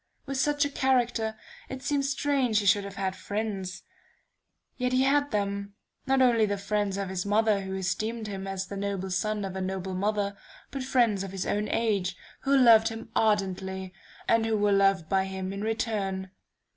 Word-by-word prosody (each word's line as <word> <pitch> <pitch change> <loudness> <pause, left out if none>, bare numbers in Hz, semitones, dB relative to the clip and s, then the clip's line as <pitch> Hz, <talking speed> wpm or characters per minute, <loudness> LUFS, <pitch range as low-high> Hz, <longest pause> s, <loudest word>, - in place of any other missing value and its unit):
"With 275 -1 -3
such 290 +1 +2
a - - -1
character, 245 -5 +1 0.3
it 265 0 -6
seems 280 -2 0
strange 275 -5 +1
he 210 - +1
should 200 +1 +4
have 200 0 -8
had 190 -1 -2
friends: 200 -4 -4 0.9
yet 250 0 -1
he 255 +1 +4
had 285 +1 +3
them, 200 -2 -2 0.3
not 265 0 +4
only 230 -4 +4
the 205 0 -1
friends 200 0 -1
of 200 -1 -2
his 185 -1 -2
mother 210 0 +2
who 190 0 -4
esteemed 215 +4 -2
him 195 -2 -5
as 190 -1 -3
the 200 - -7
noble 195 -1 -3
son 210 +2 -1
of 190 -1 -5
a 190 - -3
noble 190 0 -3
mother, 200 +1 0 0.4
but 275 - -4
friends 240 -6 +2
of 195 - -6
his 190 -1 -3
own 210 +1 0
age, 200 -5 0 0.2
who 275 0 +2
loved 230 -4 +7
him 225 0 -6
ardently, 190 -3 0 0.3
and 230 -1 +3
who 220 -1 +1
were 205 0 +2
loved 195 -4 +3
by 190 +2 +2
him 190 0 -4
in 200 - -5
return.... 205 -4 -2
205 Hz, 185 wpm, -28 LUFS, 190-230 Hz, 0.9 s, loved